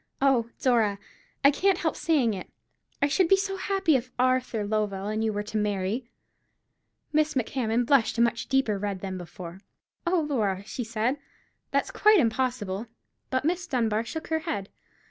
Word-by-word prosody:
Oh, 260 -4 +3
Dora, 225 -6 +2 0.5
I 280 - +9
can't 380 +5 +2
help 325 -2 -1
saying 275 -9 +2
it, 185 - -7 0.5
I - - +5
should 345 +5 +3
be 390 - +6
so 390 0 -2
happy 385 -5 +2
if 255 -1 -1
Arthur 255 -4 +1
Lovell 205 -2 -1
and 215 +1 -1
you 220 - +1
were 205 0 -2
to 215 +1 -4
marry." 210 +3 -1 1.0
Miss 310 0 +2
Macmahon 245 -1 0
blushed 255 -3 +3
a - - +3
much 235 0 +1
deeper 265 -7 +1
red 200 -2 -3
than 190 -1 -4
before. 175 +1 -9 0.5
"Oh, 350 -1 +3
Laura," 205 -9 0
she 245 - -4
said, 230 +4 -1 0.5
"that's - - 0
quite 425 0 +5
impossible." 235 - 0 0.4
But 260 +1 0
Miss 355 +2 0
Dunbar 225 -6 +1
shook 320 +7 -6
her 320 0 +1
head. 310 - -4
240 Hz, 165 wpm, -27 LUFS, 210-290 Hz, 1.0 s, I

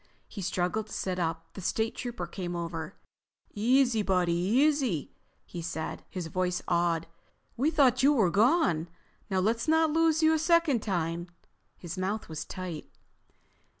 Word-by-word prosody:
He 205 - -8
struggled 185 +3 -1
to - - -10
sit 185 -1 -2
up. 165 -1 -3
The 195 - -8
State 220 +5 -1
Trooper 240 -8 -4
came 175 0 -5
over. 170 0 -5 0.6
"Easy, 240 +1 +3
buddy, 180 -4 +1
easy," 235 - +1 0.3
he 175 - -7
said, 160 -1 -5
his 180 -3 -5
voice 180 +2 -1
awed. 170 -2 +1 0.5
"We 275 +6 +2
thought 265 -5 +3
you 280 +2 +6
were 210 -10 +3
gone. 200 - +3 0.4
Now 190 -1 +1
let's 225 +7 0
not 320 -1 +3
lose 325 0 +3
you 315 0 +5
a 320 - +1
second 325 -6 +3
time." 170 -3 -2 0.5
His 175 +1 -7
mouth 200 +2 -2
was 155 -1 -5
tight. 180 -5 -6
190 Hz, 150 wpm, -29 LUFS, 175-255 Hz, 0.6 s, you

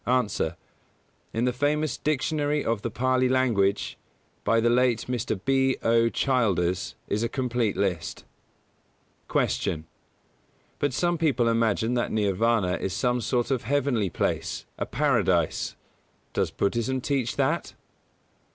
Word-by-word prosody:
_ 125 -4 +1
A. - - -1 0.7
In 115 +2 0
the 125 - +1
famous 145 +2 0
Dictionary 150 0 0
of 115 -2 0
the 115 - -2
Pālī 130 +2 +1
Language, 115 -7 +1 0.4
by 115 +2 +3
the 115 - +2
late 125 -2 +2
Mr. 120 -4 -2
B. 135 -1 +2
O. 115 0 +4
Childers, 100 - 0
is 105 - -1
a 115 - 0
complete 120 -5 -1
list. 90 -5 -2 1.0
132. 80 -1 0
Q. - - -28 0.9
_But 145 - +1
some 175 +5 +1
people 135 -7 +2
imagine 115 0 +1
that 120 -1 0
Nirvāna 105 -2 +1
is 95 - -2
some 125 +3 0
sort 120 +2 0
of 130 -3 +1
heavenly 130 -8 +1
place, - - -2
a - - -2
Paradise. - - +1 0.6
Does - - +1
Buddhism 120 +5 -1
teach 130 -2 -1
that? - - 0
120 Hz, 135 wpm, -26 LUFS, 110-130 Hz, 1.0 s, O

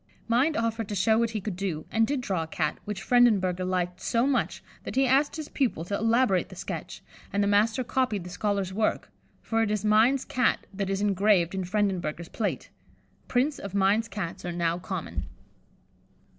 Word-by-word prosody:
Mind 255 +7 +2
offered 225 -1 -1
to 205 - -3
show 220 +4 +3
what 230 0 +2
he 220 -1 -3
could 200 -1 -4
do, 175 -5 -3
and 225 0 +3
did 280 -2 -1
draw 190 -8 -1
a 160 - -4
Cat, 160 -1 -2
which 205 -2 -5
Frendenberger 200 -7 +3
liked 180 -1 -2
so 235 +1 +1
much 275 -1 0 0.2
that - - -6
he 270 +1 +4
asked 275 +3 +3
his 310 -2 -5
pupil 235 - -1
to 200 - -6
elaborate 225 -3 +2
the - - -11
sketch, - - -6 0.3
and 200 +1 +1
the - - +1
master 215 +4 +3
copied 245 -6 0
the 180 - -9
scholar's 200 -1 -1
work, 215 +2 -1 0.3
for 225 0 0
it 225 - +1
is 210 -1 -1
Mind's 225 +6 +4
Cat 250 -2 +1
that 195 0 -3
is 195 0 -1
engraved 200 -3 +3
in 190 -1 -2
Frendenberger's 180 -4 -1
plate. 215 -3 -3 0.6
Prints 265 +4 +1
of 200 0 -7
Mind's 200 +3 +3
Cats 195 -7 -5
are 175 - -3
now 170 0 0
common. 180 -2 -5
205 Hz, 190 wpm, -27 LUFS, 185-230 Hz, 0.6 s, he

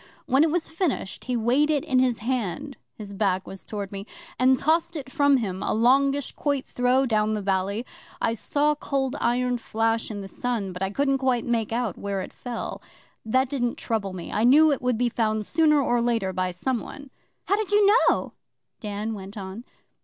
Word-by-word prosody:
When 270 +4 +4
it 325 - +3
was 330 +1 -1
finished, 320 - -2
he 250 -1 -1
weighed 250 +7 +2
it 295 -3 +1
in 255 - +2
his 250 -3 +2
hand 255 +3 -2 0.2
(his 205 -2 -9
back 190 -2 0
was 195 - -9
towards 205 -2 -5
me), 200 +1 -7 0.3
and 260 +1 +5
tossed 325 +5 +1
it 275 -4 -6
from 285 -2 +4
him 195 -6 -3
a - - 0
longish 275 +4 +3
quoit 285 -3 -1
throw 250 +2 +2
down 215 -2 +1
the - - -2
valley. 195 +4 -1 0.3
I 230 - +1
saw 290 +6 +1
Cold 275 -2 -2
Iron 245 0 +1
flash 225 0 -1
in 205 -2 -5
the 195 - -7
sun, 215 -4 -3
but 180 - -8
I 190 - 0
couldn't 275 +5 +1
quite 255 -3 +1
make 230 -3 0
out 230 -5 -2
where 200 -1 -2
it - - -8
fell. 245 -2 -6 0.4
That 260 +4 +2
didn't 245 -3 -1
trouble 205 -4 -2
me. 175 -2 -7
I 215 - 0
knew 300 +6 +6
it 280 - -1
would 250 -2 +1
be 245 +1 +2
found 220 -2 0
sooner 300 +1 +3
or 240 -3 +1
later 225 -5 0
by 185 0 -1
someone.' 260 +8 -4 0.3
'How 400 - +2
did 420 -1 -3
you 410 0 +5 0.2
know?' - - -1 0.5
Dan 210 +1 -4
went 200 +1 -8
on. 195 +4 -7
240 Hz, 200 wpm, -25 LUFS, 210-275 Hz, 0.5 s, knew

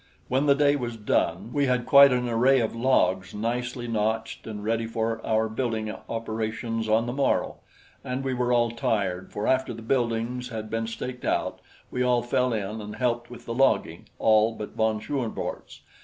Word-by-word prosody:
When 135 +3 +1
the 140 - +6
day 145 0 +4
was 120 -4 -4
done, 105 0 0
we 140 -1 +2
had 125 -1 +1
quite 140 -1 +8
an 125 -1 +1
array 125 +3 +4
of 115 -1 -1
logs 95 -7 +1
nicely 120 +3 -2
notched 110 0 -2
and 105 -2 -6
ready 115 +1 0
for 115 0 -2
our 110 0 +1
building 110 -2 -2 0.2
operations 115 0 -3
on 110 +2 +3
the 120 - -3
morrow, 140 0 0 0.5
and 130 +1 -3
we 135 -1 -1
were 125 0 0
all 120 -1 +3
tired, 100 -5 -1
for 105 - -3
after 130 -2 +1
the 115 - -9
buildings 120 0 -1
had 110 -2 -6
been 115 0 -1
staked 125 +2 -6
out - - -1 0.3
we 125 - -2
all 125 -1 +2
fell 125 +1 +1
in 110 0 -3
and 105 0 -7
helped 120 -1 -1
with 120 - -11
the 115 - -4
logging 135 +3 +1
all 110 +1 +4
but 105 - -6
von 110 -1 +1
Schoenvorts. 125 -1 -4
115 Hz, 185 wpm, -26 LUFS, 110-125 Hz, 0.5 s, quite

